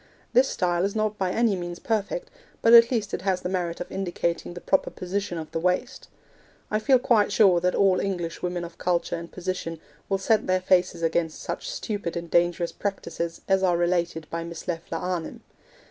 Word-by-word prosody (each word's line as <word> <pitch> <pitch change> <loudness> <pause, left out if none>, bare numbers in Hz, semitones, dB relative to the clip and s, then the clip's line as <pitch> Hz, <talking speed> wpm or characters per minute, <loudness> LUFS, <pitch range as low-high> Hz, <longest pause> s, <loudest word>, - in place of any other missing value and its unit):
This 255 +2 +5
style 175 -1 0
is 200 +2 -1
not 215 -1 -1
by 190 -1 +1
any 225 0 +2
means 175 -1 -5
perfect, 225 - -2 0.3
but 230 - +6
at 235 0 +9
least 215 -5 -1
it - - -2
has 185 -1 0
the 180 - -3
merit 175 -2 -2
of 175 - -6
indicating 175 -2 -2
the - - -6
proper 190 +2 +1
position 185 -1 -3
of 160 -1 -6
the - - -2
waist. 180 +10 -1 0.6
I 215 - +2
feel 260 +4 +5
quite 225 -4 +3
sure 195 -4 +5
that 180 +1 +1
all 190 -2 +4
English 175 -4 -3
women 180 -1 -2
of 170 0 -9
culture 175 -1 0
and 170 0 -7
position 180 -3 -4 0.3
will 195 - +2
set 215 +2 +1
their 185 0 +3
faces 185 -2 +2
against 165 -1 0
such - - -4
stupid 205 - -3
and 170 -1 -6
dangerous 175 0 +2
practices 170 -4 -4
as 190 0 +3
are 180 -2 +3
related 170 -2 0
by 165 0 -3
Miss 170 +2 -8
Leffler 165 -1 -3
Arnim. 180 -1 -4
180 Hz, 195 wpm, -26 LUFS, 170-200 Hz, 0.6 s, at